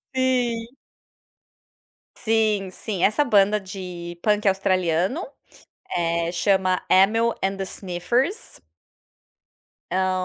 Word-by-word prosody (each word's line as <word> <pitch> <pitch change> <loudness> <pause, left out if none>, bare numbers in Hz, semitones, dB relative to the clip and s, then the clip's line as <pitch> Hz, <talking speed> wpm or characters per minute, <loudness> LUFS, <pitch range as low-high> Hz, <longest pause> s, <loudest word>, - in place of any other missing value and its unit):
Sim! 250 -3 +1 1.5
Sim, 215 -4 +1
sim. 195 -2 -4
Essa 215 +8 +3
banda 210 -3 +3
de 180 -3 -8
punk 210 -1 +1
australiano, 190 - +1 0.7
eh, 170 0 0
chama 185 +1 +1
Amyl 225 +5 +4
and 195 0 0
the 195 - -3
Sniffers 235 - -2 1.3
hã, 185 0 +1
195 Hz, 90 wpm, -23 LUFS, 185-225 Hz, 1.5 s, Amyl